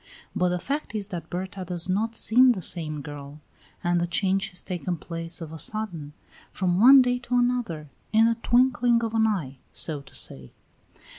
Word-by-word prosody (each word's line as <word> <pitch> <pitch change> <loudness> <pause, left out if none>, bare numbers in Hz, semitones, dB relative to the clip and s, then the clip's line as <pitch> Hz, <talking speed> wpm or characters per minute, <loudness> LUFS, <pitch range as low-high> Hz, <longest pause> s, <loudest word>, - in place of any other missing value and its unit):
But 180 0 +2
the 180 - 0
fact 275 - -4
is 205 -1 -2
that 175 -4 -6
Berta 190 +2 -5
does 175 -1 -3
not 220 +5 0
seem 250 +3 +5
the 200 -8 +1
same 155 -4 -3
girl. 145 0 -9 0.4
And 175 0 +2
the 175 - 0
change 195 +3 0
has 180 - -6
taken 180 -1 -3
place 165 +1 -4
of 160 -2 -7
a 160 - -7
sudden, 175 -10 -3 0.4
from 185 0 0
one 265 +2 +9
day 245 0 0
to 245 0 -1
another, 245 -11 0 0.2
in 220 +1 +5
the 230 - +4
twinkling 240 0 +3
of 225 -1 -2
an 220 -1 +3
eye, 150 -11 -2
so 150 -3 -3
to 140 - -15
say. 65 -2 -4
185 Hz, 190 wpm, -26 LUFS, 165-230 Hz, 0.4 s, one